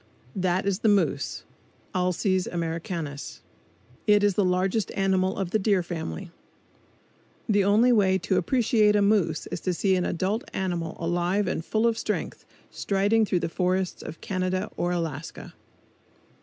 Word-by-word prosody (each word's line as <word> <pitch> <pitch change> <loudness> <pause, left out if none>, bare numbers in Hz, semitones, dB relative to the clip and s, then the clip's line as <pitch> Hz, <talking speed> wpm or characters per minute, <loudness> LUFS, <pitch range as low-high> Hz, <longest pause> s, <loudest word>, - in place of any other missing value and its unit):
That 185 0 0
is 200 -1 0
the 220 - +2
moose 170 -9 +1 0.5
(Alces 185 +1 0
americanus). 165 -3 -4 0.6
It 210 -1 +5
is 205 -1 +4
the 205 - +2
largest 185 +3 0
animal 190 -1 +1
of 190 -3 -3
the 220 - +2
deer 195 -3 +2
family. 170 +1 -5 1.2
The 205 -3 +3
only 215 +5 +4
way 195 -5 +4
to 190 +1 0
appreciate 220 -1 +3
a 205 - +4
moose 195 -7 +2
is - - -3
to 185 -2 -2
see 190 +2 +2
an 180 - 0
adult 195 - -1
animal 175 -3 -2
alive 175 +4 0
and 175 - -2
full 220 +6 0
of 230 -1 +1
strength, - - -3 0.3
striding 205 +3 +1
through 180 -3 0
the - - -1
forests 180 +2 -1
of 165 - -9
Canada 185 +1 -2
or 175 - -1
Alaska. 165 -3 -4
185 Hz, 150 wpm, -26 LUFS, 175-205 Hz, 1.2 s, It